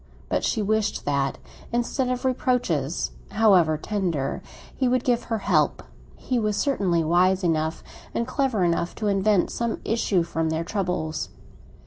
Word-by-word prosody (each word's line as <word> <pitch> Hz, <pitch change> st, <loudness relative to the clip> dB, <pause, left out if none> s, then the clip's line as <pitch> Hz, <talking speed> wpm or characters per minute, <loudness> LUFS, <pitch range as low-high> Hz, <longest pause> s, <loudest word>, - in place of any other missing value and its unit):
But -, -, 0 dB
she 215 Hz, -, 0 dB
wished 215 Hz, 0 st, 0 dB
that, 140 Hz, -1 st, 0 dB, 0.3 s
instead 240 Hz, +2 st, 0 dB
of 250 Hz, +1 st, -2 dB
reproaches, 240 Hz, -, 0 dB, 0.2 s
however 190 Hz, -7 st, +4 dB
tender, 170 Hz, -7 st, -2 dB, 0.3 s
he 260 Hz, -, +1 dB
would 250 Hz, 0 st, +2 dB
give 240 Hz, -2 st, +1 dB
her 225 Hz, -, -1 dB
help; 165 Hz, -7 st, +1 dB, 0.3 s
he 250 Hz, -, -1 dB
was 215 Hz, -2 st, 0 dB
certainly 190 Hz, -, +1 dB
wise 180 Hz, +4 st, +3 dB
enough, 160 Hz, -1 st, 0 dB, 0.3 s
and 235 Hz, -, -1 dB
clever 255 Hz, -6 st, 0 dB
enough, 170 Hz, 0 st, 0 dB
to 215 Hz, -, -4 dB
invent 200 Hz, -1 st, +2 dB
some 235 Hz, -1 st, -2 dB
issue 205 Hz, -5 st, +1 dB
from 165 Hz, -1 st, -1 dB
their 160 Hz, +1 st, -1 dB
troubles. 180 Hz, -5 st, -2 dB
195 Hz, 145 wpm, -25 LUFS, 165-235 Hz, 0.3 s, however